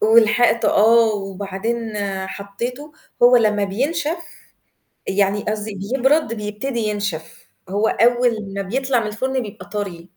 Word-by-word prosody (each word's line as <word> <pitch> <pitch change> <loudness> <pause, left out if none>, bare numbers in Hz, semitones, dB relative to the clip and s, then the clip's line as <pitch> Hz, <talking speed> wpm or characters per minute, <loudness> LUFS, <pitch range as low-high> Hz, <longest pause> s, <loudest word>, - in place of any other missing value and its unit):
ولحقته 230 +1 +4
آه، 225 +1 +5
وبعدين 200 +4 -4 0.4
حطيته، 240 +9 -6 0.3
هو 245 +1 +8
لمّا 210 -3 +2
بينشف 295 - -1 0.9
يعني 200 +1 +1
قصدي 215 0 -3 0.2
بيبرد 270 -1 +2
بيبتدي 215 +4 -4
ينشف، 205 -7 -4 0.2
هو 205 +3 +1
أول 240 0 +3 0.2
ما 200 - -1
بيطلع 255 +5 0
من 220 - -3
الفرن 260 +5 -2
بيبقى 210 -3 -10
طَرِي. 195 -5 -4
220 Hz, 120 wpm, -20 LUFS, 205-245 Hz, 0.9 s, هو